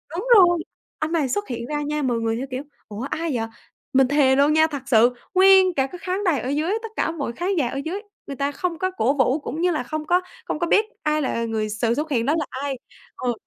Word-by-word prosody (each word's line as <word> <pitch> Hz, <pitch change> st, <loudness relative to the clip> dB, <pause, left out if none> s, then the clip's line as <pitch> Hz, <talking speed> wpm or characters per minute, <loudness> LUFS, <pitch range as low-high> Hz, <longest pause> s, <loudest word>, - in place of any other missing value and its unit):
đúng 385 Hz, +8 st, -4 dB
rồi, 350 Hz, -2 st, +6 dB, 0.4 s
anh 310 Hz, +1 st, -2 dB
này 300 Hz, -6 st, +1 dB
xuất 410 Hz, +11 st, -2 dB
hiện 235 Hz, -1 st, -4 dB
ra 295 Hz, +1 st, -2 dB
nha 300 Hz, +1 st, -2 dB
mọi 245 Hz, -3 st, +1 dB
người 225 Hz, 0 st, -1 dB
theo 265 Hz, -, -4 dB
kiểu: 255 Hz, +2 st, -4 dB, 0.2 s
"Ủa 210 Hz, +1 st, -7 dB
ai 325 Hz, -1 st, -2 dB
vậy?" 225 Hz, -1 st, -1 dB, 0.5 s
Mình 265 Hz, -1 st, +5 dB
thề 275 Hz, -1 st, +4 dB
luôn 285 Hz, +2 st, +4 dB
nha, 315 Hz, 0 st, +5 dB
thật 285 Hz, -4 st, -6 dB
sự 240 Hz, 0 st, +5 dB, 0.2 s
nguyên 380 Hz, -1 st, +6 dB
cả 270 Hz, -1 st, +1 dB
cái 355 Hz, +5 st, -10 dB
khán 375 Hz, +2 st, -2 dB
đài 325 Hz, -7 st, +2 dB
ở 255 Hz, -, -4 dB
dưới, 305 Hz, +5 st, 0 dB
tất 450 Hz, -, -5 dB
cả 325 Hz, -, 0 dB
mọi 285 Hz, -7 st, -4 dB
khán 365 Hz, +8 st, -1 dB
giả 280 Hz, -6 st, +2 dB
ở 270 Hz, -, -5 dB
dưới 375 Hz, +6 st, -3 dB, 0.3 s
người 280 Hz, -, -5 dB
ta 280 Hz, +1 st, 0 dB
không 340 Hz, +3 st, -3 dB
có 370 Hz, 0 st, 0 dB
cổ 270 Hz, -7 st, +1 dB
vũ 260 Hz, +2 st, +2 dB
cũng 310 Hz, +2 st, -5 dB
như 360 Hz, -, +3 dB
là 305 Hz, -7 st, -1 dB
không 310 Hz, +4 st, -4 dB
có 355 Hz, +2 st, +3 dB, 0.2 s
không -, -, -3 dB
có 345 Hz, -, 0 dB
biết 420 Hz, +5 st, +4 dB, 0.2 s
ai 305 Hz, 0 st, +1 dB
là 230 Hz, -4 st, -1 dB
người 220 Hz, -1 st, -2 dB
sự 225 Hz, +2 st, 0 dB
xuất 300 Hz, +2 st, -3 dB
hiện 235 Hz, -3 st, +1 dB
đó 295 Hz, -, +2 dB
là 305 Hz, -, -2 dB
ai. 275 Hz, 0 st, -4 dB, 0.4 s
Ờ. 245 Hz, -1 st, -1 dB
295 Hz, 265 wpm, -23 LUFS, 255-340 Hz, 0.5 s, rồi